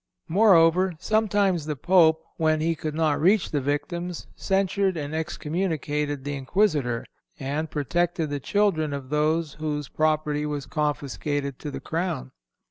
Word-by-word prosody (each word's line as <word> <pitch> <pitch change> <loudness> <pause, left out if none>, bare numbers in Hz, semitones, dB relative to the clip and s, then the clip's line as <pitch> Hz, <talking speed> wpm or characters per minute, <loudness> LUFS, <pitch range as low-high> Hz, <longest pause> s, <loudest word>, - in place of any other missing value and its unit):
Moreover, 185 -1 +5
sometimes 200 -4 +1
the 150 - -2
Pope, 160 +1 +4
when 155 -1 +2
he 165 +2 +1
could 155 -1 -5
not 155 -2 +1
reach 195 +4 +3
the 145 - 0
victims, 170 +5 -3
censured 195 -1 +1
and 145 0 -4
excommunicated 155 -3 -2
the 145 +1 -3
Inquisitor, 135 - 0 0.3
and 145 +4 -2
protected 160 +2 -1
the 145 - -2
children 160 -3 +1
of 135 -2 -6
those 155 +1 +1
whose 150 -2 -3
property 155 -1 0
was 150 -2 -3
confiscated 145 -1 -2
to 150 - -5
the 135 -1 -5
crown. 165 - -3
155 Hz, 135 wpm, -25 LUFS, 145-175 Hz, 0.3 s, Moreover